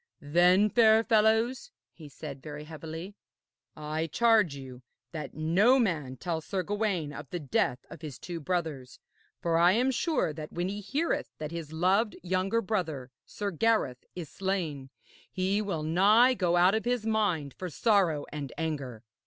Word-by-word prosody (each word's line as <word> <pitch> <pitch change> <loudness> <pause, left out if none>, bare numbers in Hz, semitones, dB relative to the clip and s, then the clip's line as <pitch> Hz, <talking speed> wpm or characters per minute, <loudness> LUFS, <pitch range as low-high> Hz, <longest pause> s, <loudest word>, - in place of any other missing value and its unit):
'Then, 180 +7 +4
fair 220 0 +5
fellows,' 225 - +2 0.2
he 155 -3 -12
said, 140 -1 -8
very 150 0 -8
heavily, 160 +4 -8 0.6
'I 155 +2 -3
charge 215 -4 +3
you 130 -2 -10 0.3
that 150 -3 -6
no 185 +12 +4
man 155 - -1
tell 165 +4 -3
Sir 185 +3 -3
Gawaine 200 -6 -1
of 135 - -9
the 175 - -4
death 130 -3 -1
of 165 - -12
his 150 -5 -7
two 175 -2 -6
brothers; 155 -6 -3 0.5
for 165 -1 +2
I 175 +2 +6
am 250 +5 +2
sure 275 - 0
that 155 0 -8
when 175 +2 -2
he 205 +1 -5
heareth 290 - -1
that 155 0 -5
his 165 -3 -6
loved 190 +7 +1
younger 185 +5 0
brother, 160 - -3 0.2
Sir 205 -1 -4
Gareth, 190 - +1
is 175 -3 -6
slain, 165 -9 -3 0.4
he 190 +3 0
will 185 -7 -3
nigh 205 +10 +5
go 175 -6 +1
out 180 +2 +5
of 220 - 0
his 245 -2 -1
mind 200 - 0
for 185 - -6
sorrow 175 - +2
and 145 -3 -5
anger.' 140 -8 -4
175 Hz, 160 wpm, -29 LUFS, 150-210 Hz, 0.6 s, I